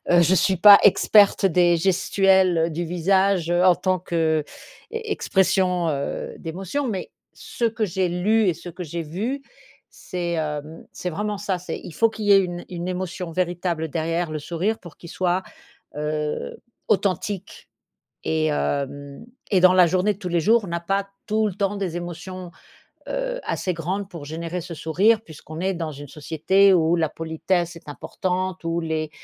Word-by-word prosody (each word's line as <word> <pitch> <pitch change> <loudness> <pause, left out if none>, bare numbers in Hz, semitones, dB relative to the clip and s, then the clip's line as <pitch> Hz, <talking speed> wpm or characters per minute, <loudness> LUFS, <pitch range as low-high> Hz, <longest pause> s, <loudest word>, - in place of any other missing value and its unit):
Heu, 175 0 +6
je 175 +3 +4
suis 185 +2 +2
pas 205 +1 +10
experte 205 0 +5
des 175 -1 +4
gestuelles 190 -2 +3
du 170 +3 -2
visage 180 +1 +1
en 175 +1 +5
tant 185 +1 0
qu'e 160 -3 0 0.5
expression 190 - +1
heu, 140 -2 -3
d'émotions, 190 - -4
mais 195 -5 -4 0.2
ce 235 - -5
que 220 -1 +1
j'ai 185 0 0
lu 200 +4 +2
et 175 - +2
ce 175 - -10
que 180 +2 -7
j'ai 170 0 -4
vu, 220 - -4 0.5
c'est, 175 -2 -5
hem, 155 -1 -4
c'est 180 - -4
vraiment 210 +4 -3
ça. 195 -2 -2
C'est 180 - -6
il 170 - -9
faut 230 0 +3
qu'il 215 -1 -6
y 205 - +6
ait 195 - +7
une 175 -1 -6
une 175 -1 -5
émotion 180 -1 -4
véritable 175 -2 -1
derrière 165 +2 -2
le 155 - -3
sourire 175 +8 -2
pour 170 -5 -13
qu'il 170 - -12
soit, 185 0 0 0.6
heu, 150 0 -3 0.3
authentique 200 0 -1 0.6
et 160 0 +1
hem 140 +2 -3 0.3
et 190 - +4
dans 185 0 +6
la 180 -2 +6
journée 185 +4 +1
de - - -20
tous 185 - -5
les 170 -1 +1
jours, 225 +4 +3
on - - -6
n'a 170 0 -2
pas 195 +3 -1 0.2
tout 215 0 +1
le 200 - -3
temps 200 +1 -1
des 180 -4 -3
émotions, 175 +1 -7 0.6
heu, - - -3
assez 185 - -2
grandes 185 +4 -3
pour 165 -6 -9
générer 165 +3 -4
ce 170 0 -7
sourire 190 +9 +2
puisqu'on 160 0 -10
est 190 +1 0
dans 165 -3 -4
une 145 0 -10
société 165 +7 +3
où 165 -1 +3
la 160 -2 +1
politesse 170 +3 -2
est 165 - -14
importante, 180 +4 -3
où 165 +1 -1
les 160 -1 -2
180 Hz, 175 wpm, -23 LUFS, 165-195 Hz, 0.6 s, pas